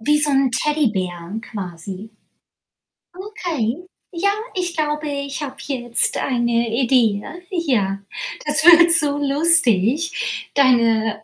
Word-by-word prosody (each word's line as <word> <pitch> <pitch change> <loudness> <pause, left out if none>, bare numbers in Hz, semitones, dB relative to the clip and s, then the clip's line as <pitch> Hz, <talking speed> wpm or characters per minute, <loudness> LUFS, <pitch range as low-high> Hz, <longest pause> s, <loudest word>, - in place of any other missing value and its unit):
Wie 295 +6 +2
so 295 -1 +1
'n 270 -1 +2
Teddybär 215 - -2
quasi. 195 -1 -8 1.1
Okay. 345 - -4 0.3
Ja, 380 +4 +1 0.3
ich 355 -2 -3
glaube, 300 0 -2
ich 280 +1 -4
habe 270 -2 -6
jetzt 240 -4 0
eine 235 -2 0
Idee, 235 -5 +2
ja. - - -9 0.2
Ja, 240 - 0 0.5
das 300 +1 0
wird 340 0 +8
so 295 -4 +2
lustig. 290 - +1
Deine, 230 -5 +2
270 Hz, 110 wpm, -20 LUFS, 225-305 Hz, 1.1 s, wird